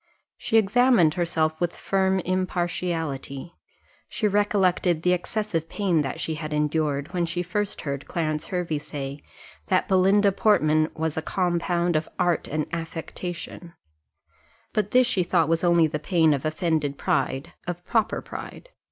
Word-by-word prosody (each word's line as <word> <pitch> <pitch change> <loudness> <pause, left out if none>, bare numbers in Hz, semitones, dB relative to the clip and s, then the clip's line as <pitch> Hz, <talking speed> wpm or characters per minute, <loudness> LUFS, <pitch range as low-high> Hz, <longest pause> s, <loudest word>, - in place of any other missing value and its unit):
She 225 - +1
examined 220 -5 +4
herself 160 -2 0
with 175 -1 0
firm 190 -1 +1
impartiality; 175 -5 -2 0.6
she 220 -5 0
recollected 190 -5 +2
the 180 - +4
excessive 180 -2 -2
pain 185 -6 +1
that 135 -3 -4
she 160 - -2
had 155 0 -5
endured, 150 0 0
when 175 -2 0
she 175 +2 -2
first 205 +3 -2
heard 140 -2 -4
Clarence 155 -2 -2
Hervey 175 -5 -2
say, 140 -1 -6 0.5
that - - +2
Belinda 195 +2 +4
Portman 155 -7 +3
was 160 -1 -2
a - - +1
compound 175 0 0
of 155 +1 0
art 175 -3 +1
and 155 0 -1
affectation; 170 +1 -6 1.0
but 210 -2 0
this 255 +3 +5
she 200 -6 +1
thought 175 -2 +2
was 165 +1 +1
only 170 -2 +5
the 155 -1 -2
pain 160 -1 +3
of 140 0 -3
offended 155 -3 0
pride 135 +5 -1
of 175 0 -5
proper 225 -2 0
pride. - - -9
170 Hz, 145 wpm, -25 LUFS, 155-185 Hz, 1.0 s, this